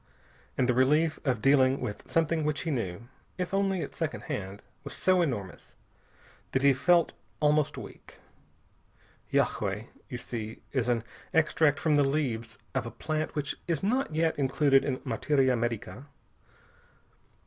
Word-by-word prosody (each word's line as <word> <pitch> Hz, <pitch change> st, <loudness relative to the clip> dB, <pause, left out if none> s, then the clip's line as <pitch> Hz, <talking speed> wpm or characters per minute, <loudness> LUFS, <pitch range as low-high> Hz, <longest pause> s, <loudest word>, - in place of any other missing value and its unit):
And 125 Hz, -, +2 dB
the 125 Hz, -, +3 dB
relief 150 Hz, +6 st, +3 dB
of 125 Hz, -6 st, 0 dB
dealing 135 Hz, -1 st, +4 dB
with 110 Hz, -5 st, -6 dB
something 165 Hz, -1 st, +1 dB
which 150 Hz, 0 st, -1 dB
he 165 Hz, -, -2 dB
knew 95 Hz, -9 st, -2 dB, 0.4 s
if 180 Hz, 0 st, -3 dB
only 195 Hz, -2 st, +1 dB
at -, -, -7 dB
second 160 Hz, -2 st, -3 dB
hand 100 Hz, -9 st, -5 dB, 0.2 s
was -, -, -6 dB
so 185 Hz, -1 st, +3 dB
enormous 115 Hz, -, -4 dB, 0.8 s
that 130 Hz, -, +1 dB
he 140 Hz, -1 st, +6 dB
felt 170 Hz, +5 st, +3 dB, 0.3 s
almost 150 Hz, 0 st, +2 dB
weak. -, -, -11 dB, 1.1 s
Yagué, -, -, 0 dB, 0.2 s
you 125 Hz, -, -4 dB
see, 115 Hz, -2 st, -6 dB
is 130 Hz, -3 st, 0 dB
an 120 Hz, -2 st, +1 dB, 0.3 s
extract 155 Hz, -2 st, +3 dB
from 155 Hz, -2 st, +2 dB
the 145 Hz, -, +5 dB
leaves 130 Hz, -5 st, -1 dB, 0.2 s
of 130 Hz, -3 st, -1 dB
a -, -, -3 dB
plant 155 Hz, +4 st, -3 dB
which 150 Hz, -1 st, -2 dB
is 165 Hz, -2 st, -1 dB
not 235 Hz, -, 0 dB
yet 160 Hz, -1 st, +1 dB
included 135 Hz, 0 st, +3 dB
in 130 Hz, -3 st, -1 dB
materia 135 Hz, -4 st, +2 dB
medica. 120 Hz, +3 st, -3 dB
140 Hz, 150 wpm, -29 LUFS, 125-155 Hz, 1.1 s, he